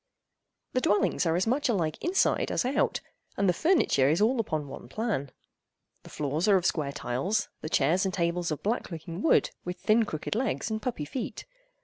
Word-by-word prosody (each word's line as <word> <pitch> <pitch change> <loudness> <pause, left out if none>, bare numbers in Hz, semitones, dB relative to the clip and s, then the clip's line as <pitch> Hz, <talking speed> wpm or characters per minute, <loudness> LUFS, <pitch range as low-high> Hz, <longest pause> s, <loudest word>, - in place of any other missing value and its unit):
The 255 - +1
dwellings 205 -4 +2
are 165 - +2
as 180 - +1
much 260 +4 +1
alike 165 -9 -1
inside 360 +3 +2
as - - 0
out, 275 +3 +1 0.4
and 200 - +2
the 180 - +4
furniture 245 - +3
is 160 - +2
all 230 +4 +3
upon 155 -9 -2
one 125 -2 -9
plan. 205 - -2 0.7
The - - -14
floors 150 +5 -1
are 200 -2 +6
of 180 - -2
square 145 -4 0
tiles, 145 - -1
the 155 - -5
chairs 160 +6 +2
and 190 - 0
tables 170 -1 -1
of 155 - -4
black 225 +4 -1
looking 165 +1 -6
wood 325 - +3
with 180 +1 -5
thin 220 +1 +3
crooked 155 -6 -4
legs 230 -1 -1
and 220 0 -2
puppy 220 -12 -3
feet. 250 - -5
185 Hz, 195 wpm, -28 LUFS, 155-225 Hz, 0.7 s, are